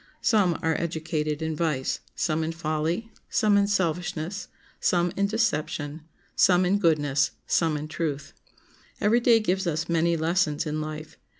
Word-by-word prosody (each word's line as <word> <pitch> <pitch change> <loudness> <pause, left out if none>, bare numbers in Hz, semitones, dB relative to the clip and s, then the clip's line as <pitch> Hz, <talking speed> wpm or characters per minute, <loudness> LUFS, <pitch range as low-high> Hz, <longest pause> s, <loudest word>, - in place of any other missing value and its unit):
Some 200 -8 +3
are 160 0 +2
educated 160 -2 -2
in 160 0 -2
vice, 150 -5 -1 0.2
some 160 0 0
in 160 +1 -2
folly, 165 +6 -2 0.2
some 210 -1 +3
in 200 0 +4
selfishness, 180 -1 -2 0.3
some 175 -1 +2
in 200 0 +1
deception, 160 -8 -1 0.3
some 180 -1 +4
in 195 +3 +2
goodness, 145 -6 +2 0.2
some 160 -3 +1
in 150 +1 -5
truth. 150 -3 -4 0.7
Every 220 +4 +3
day 235 -1 +5
gives 190 -3 0
us 165 0 -1
many 170 0 +2
lessons 160 -1 +1
in 155 0 -2
life. 155 0 -7
165 Hz, 145 wpm, -26 LUFS, 155-185 Hz, 0.7 s, day